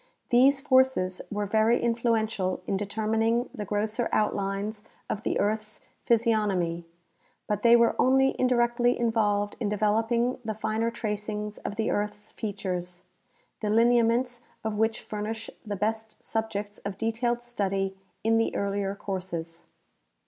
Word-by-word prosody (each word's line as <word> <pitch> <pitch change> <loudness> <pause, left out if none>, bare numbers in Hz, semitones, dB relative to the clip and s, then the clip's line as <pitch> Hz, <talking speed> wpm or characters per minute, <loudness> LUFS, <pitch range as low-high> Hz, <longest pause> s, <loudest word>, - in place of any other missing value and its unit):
These 270 +3 +5
forces 260 -9 +3
were 205 0 -2
very 220 +3 +3
influential 225 -6 0
in 195 - -1
determining 220 +4 0
the 210 - -5
grosser 215 +4 -1
outlines 205 0 -1 0.2
of 215 - -3
the - - -1
earth's 215 +1 -1 0.2
physiognomy, 205 -8 +1 0.6
but 210 -1 -1
they 235 +1 +7
were 235 -1 +5
onl}^ 265 +1 +4
indirectly 240 -1 +2
involved 210 -3 +1
in 220 -4 -1
de 210 - -1
veloping 225 +4 +1
the 220 -1 -3
finer 220 +2 0
tracings 210 -2 -4
of 205 - -5
the 220 0 0
earth's 210 +1 -3
features, 180 -4 -4 0.6
the 210 - -2
lineaments 235 +2 +3 0.2
of 220 -1 -1
which 220 +1 +1
furnish 215 +1 -5
the 210 -2 -4
best 220 +2 -2
subjects 210 -2 -3
of 200 -1 -5
detailed 235 +2 -1
study 195 -5 -1 0.3
in 225 +1 +3
the 225 - 0
earlier 200 0 -1
courses. 170 -4 -5
215 Hz, 135 wpm, -27 LUFS, 205-230 Hz, 0.6 s, they